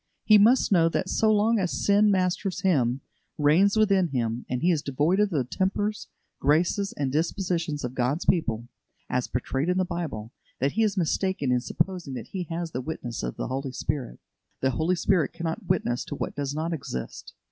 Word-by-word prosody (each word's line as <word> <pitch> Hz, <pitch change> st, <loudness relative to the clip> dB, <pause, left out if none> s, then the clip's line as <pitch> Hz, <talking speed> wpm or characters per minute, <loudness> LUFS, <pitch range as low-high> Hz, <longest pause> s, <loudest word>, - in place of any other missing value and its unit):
He 215 Hz, -1 st, +7 dB
must 235 Hz, +4 st, +4 dB
know 165 Hz, -3 st, +5 dB
that 185 Hz, -, -2 dB
so 220 Hz, -1 st, +3 dB
long 215 Hz, +2 st, +3 dB
as 180 Hz, -2 st, 0 dB, 0.2 s
sin 205 Hz, +1 st, +5 dB
masters 185 Hz, 0 st, 0 dB
him, 135 Hz, -8 st, +2 dB, 0.4 s
reigns 170 Hz, +8 st, +4 dB
within 195 Hz, -4 st, +4 dB
him, 120 Hz, -4 st, -2 dB
and 125 Hz, +2 st, -2 dB
he 180 Hz, -, +4 dB
is 160 Hz, -4 st, +1 dB
devoid 150 Hz, +8 st, +1 dB
of 210 Hz, -1 st, +3 dB
the 150 Hz, -8 st, 0 dB
tempers, 205 Hz, -, -2 dB, 0.3 s
graces, 170 Hz, +7 st, +2 dB
and 140 Hz, -2 st, -2 dB
dispositions 165 Hz, 0 st, -1 dB
of 125 Hz, 0 st, -3 dB
God's 130 Hz, +6 st, -1 dB
people, 120 Hz, -9 st, +1 dB, 0.4 s
as 125 Hz, -1 st, 0 dB
portrayed 135 Hz, +5 st, -2 dB
in 180 Hz, -, +1 dB
the 185 Hz, -, +2 dB
Bible, 150 Hz, -12 st, -5 dB, 0.3 s
that 140 Hz, +2 st, +1 dB
he 225 Hz, -, 0 dB
is 210 Hz, -2 st, +1 dB
mistaken 175 Hz, -4 st, 0 dB
in 125 Hz, -, +3 dB
supposing 170 Hz, +2 st, -2 dB
that -, -, -7 dB
he 185 Hz, -2 st, -4 dB
has 165 Hz, +1 st, -4 dB
the 125 Hz, -, -3 dB
witness 125 Hz, -5 st, -5 dB
of -, -, -4 dB
the 135 Hz, +2 st, -3 dB
Spirit. 130 Hz, -, -3 dB, 0.4 s
The 130 Hz, -, +1 dB
Holy 160 Hz, +8 st, +1 dB
Spirit 170 Hz, -4 st, +1 dB
cannot 170 Hz, +4 st, -4 dB
witness 120 Hz, -9 st, 0 dB
to -, -, -5 dB
what -, -, -4 dB
does 145 Hz, 0 st, -3 dB
not 160 Hz, +2 st, -2 dB
exist. 95 Hz, -, -6 dB
165 Hz, 190 wpm, -26 LUFS, 135-190 Hz, 0.4 s, He